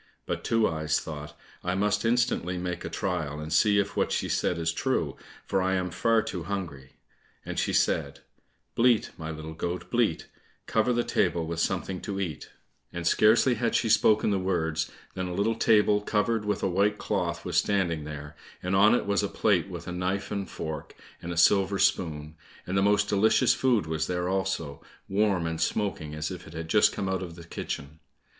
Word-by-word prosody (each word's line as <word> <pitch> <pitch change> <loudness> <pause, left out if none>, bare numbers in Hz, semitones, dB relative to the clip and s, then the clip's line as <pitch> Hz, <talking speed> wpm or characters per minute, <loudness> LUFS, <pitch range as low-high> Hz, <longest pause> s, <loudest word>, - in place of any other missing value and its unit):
But - - -3
Two 115 -1 +2
eyes 80 -1 0
thought, 75 -2 -8 0.3
"I 90 +1 -1
must 105 +2 +1
instantly 115 -6 +1
make 90 -1 -4
a - - -4
trial, 75 -1 -2
and 75 +1 -5
see 100 +5 +4
if 100 0 0
what - - +1
she - - 0
said 90 - 0
is 80 0 -1
true, 80 - -1 0.3
for 95 - 0
I 95 +1 +1
am 90 -1 -1
far 115 +5 +2
too 90 - -4
hungry," 80 -8 -5 0.5
and - - -3
she - - 0
said, 70 0 0 0.5
"Bleat, 120 -1 +3
my 80 0 -6
little 80 0 -6
goat, 85 +3 -4
bleat, 115 -9 +1 0.4
Cover 125 - +1
the 120 0 +1
table 85 -7 +1
with 80 0 -4
something 90 +2 -1
to 100 -1 -4
eat," 85 -7 -4 0.4
and 85 -1 -5
scarcely 110 +8 +4
had 120 0 -1
she 115 - +1
spoken 110 -1 +4
the 100 - +1
words 80 -4 -1 0.2
than 95 -1 -3
a 90 - -4
little 105 +4 +1
table, 105 -2 +3
covered 105 +1 0
with 105 - -1
a - - +3
white 100 +3 +1
cloth, - - -2
was - - -1
standing 85 -6 +1
there, 75 -1 -8 0.3
and 90 +1 0
on 105 +4 +6
it - - -1
was 100 0 +1
a 100 - 0
plate 100 -3 +1
with 85 -2 -7
a - - -4
knife 90 +2 -2
and 100 -2 -3
fork, 80 -2 -6 0.3
and 85 - -5
a 85 - -5
silver 95 +3 +4
spoon; 80 -6 0 0.3
and 90 - -3
the 95 - +3
most 105 +1 +3
delicious 110 +4 +4
food 120 -9 +2
was 80 0 -2
there 90 0 -1
also, 95 -6 -2 0.3
warm 100 -3 +1
and 80 0 -3
smoking 80 -5 -1
as 75 0 -3
if - - -8
it - - -12
had 80 0 -6
just - - +5
come 95 - -3
out 95 -1 -1
of 85 -3 -7
the 85 - -11
kitchen. 75 -2 -6
95 Hz, 200 wpm, -27 LUFS, 80-105 Hz, 0.5 s, on